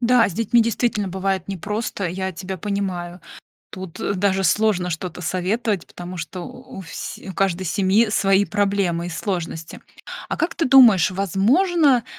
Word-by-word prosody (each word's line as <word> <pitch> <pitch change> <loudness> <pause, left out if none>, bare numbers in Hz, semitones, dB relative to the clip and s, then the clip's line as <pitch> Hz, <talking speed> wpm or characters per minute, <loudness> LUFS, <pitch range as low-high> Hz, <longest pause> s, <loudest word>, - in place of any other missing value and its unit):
Да, 245 -1 +4
с 195 - -6
детьми 230 +4 +3
действительно 225 -2 0
бывает 190 +1 -2
непросто, 200 +1 -3
я 190 +2 -3
тебя 185 +2 -6
понимаю. 185 -3 -3 0.5
Тут, 185 -3 -9
э, 200 - -1
даже 195 0 +1
сложно 185 -1 +2
что-то 175 +1 -5
советовать, 190 +3 -1
потому 180 +1 -9
что 165 +2 -6
у 175 - -10
у - - -5
всь 165 - -7
у - - -5
каждой 190 -1 0
семьи 200 +5 +2
свои 195 -1 +3
проблемы 195 -5 0
и - - -4
сложности. 165 -2 -4 0.5
А - - -2
как 335 - -1
ты 330 - 0
думаешь, 245 -10 +7
возможно, 250 - +2
195 Hz, 160 wpm, -22 LUFS, 180-215 Hz, 0.5 s, думаешь